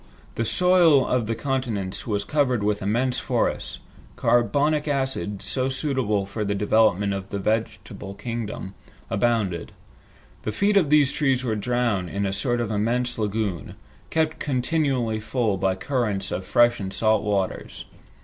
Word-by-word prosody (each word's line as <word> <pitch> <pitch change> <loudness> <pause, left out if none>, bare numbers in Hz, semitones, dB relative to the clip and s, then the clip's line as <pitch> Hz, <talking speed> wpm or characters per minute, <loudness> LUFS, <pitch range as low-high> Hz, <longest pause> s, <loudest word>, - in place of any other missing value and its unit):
The 115 - -2
soil 175 -2 +5
of 125 -3 0
the 115 - -1
continents 115 -7 -3
was 105 -2 0
covered 130 -3 +1
with 105 0 0
immense 125 +6 0
forests. - - -1 0.4
Carbonic 145 +6 +2
acid, 135 -8 -2
so 130 0 0
suitable 130 -8 0
for 105 +2 -4
the 100 0 -1
development 100 -1 +2
of 95 0 -5
the 100 - -3
vegetable 105 -1 -3
kingdom, 115 -5 -5 0.4
abounded. 105 -6 0 0.7
The 110 - -3
feet 205 - +1
of 180 -7 +4
these 145 -2 +5
trees 135 -4 +1
were 115 -3 -1
drowned 115 -4 0
in 100 +2 -2
a 95 - -1
sort 120 +4 0
of 115 -2 -2
immense 120 +4 0
lagoon, 105 -4 -2 0.3
kept 160 -1 0
continually 130 -4 0
full 110 -1 0
by 95 0 +1
currents 105 -4 -1
of 95 +1 -3
fresh 120 -1 +3
and 95 -2 -4
salt 110 +1 +2
waters. 100 -3 -2
115 Hz, 150 wpm, -24 LUFS, 100-130 Hz, 0.7 s, soil